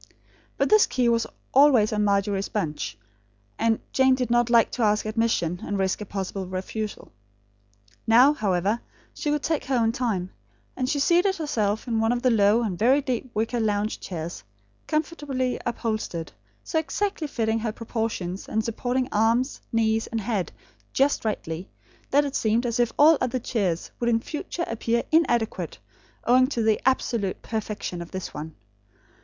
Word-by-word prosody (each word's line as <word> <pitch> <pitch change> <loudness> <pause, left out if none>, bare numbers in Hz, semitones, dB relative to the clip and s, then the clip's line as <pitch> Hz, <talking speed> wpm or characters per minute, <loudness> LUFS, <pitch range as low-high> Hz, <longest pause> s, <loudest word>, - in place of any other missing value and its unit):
But - - +1
this 430 -1 +6
key 250 -2 +1
was 230 -1 +1 0.3
always 260 -6 +5
on 210 0 +1
Margery's 200 -1 +1
bunch; 150 - -3 0.6
and 225 -1 +2
Jane 265 -1 +4
did 250 -2 -2
not 240 0 +3
like 235 -2 +4
to - - -4
ask 210 -1 +2
admission, 215 -6 0
and 205 - -2
risk 190 +1 0
a 210 - -6
possible 190 -1 -4
refusal. 195 +3 -5 1.0
Now, 250 +6 +7
however, 200 -2 0 0.3
she 300 - -3
could 295 0 0
take 315 -3 -1
her 265 - 0
own 225 -1 +2
time; 220 -8 -2 0.4
and 255 -1 -1
she 290 - 0
seated 350 +7 +3
herself 220 - -1
in 225 -2 0
one 225 +1 +2
of 245 0 -1
the 255 - +4
low 215 +1 +4
and 190 -6 -3
very 255 +6 +4
deep 255 -2 -3
wicker 225 +3 0
lounge 210 -1 0
chairs, 165 - -6 0.4
comfortably 290 -5 -1
upholstered; 215 -8 -3 0.3
so 320 - 0
exactly 340 0 -2
fitting 225 -4 0
her 225 0 -2
proportions, 220 -5 -4
and 220 0 0
supporting 250 +2 -1
arms, 230 +5 +1
knees, 225 -1 +1
and 230 - -3
head, 205 -4 -2 0.4
just 275 +2 +2
rightly, 180 -5 -3 0.4
that 290 +2 +4
it 280 - -4
seemed 225 +3 +1
as 235 0 -1
if 240 -1 +2
all 305 +1 +6
other 255 0 0
chairs 200 -8 -2
would 235 - +1
in 230 -1 +3
future 320 +6 -4
appear 230 +1 -1
inadequate, 240 -9 +1 0.5
owing 255 +2 +5
to 240 -5 -1
the 220 -1 +2
absolute 230 -6 0
perfection 210 -5 -4
of 170 - -8
this 190 -1 -6
one. 155 +1 -7
230 Hz, 165 wpm, -25 LUFS, 205-255 Hz, 1.0 s, Now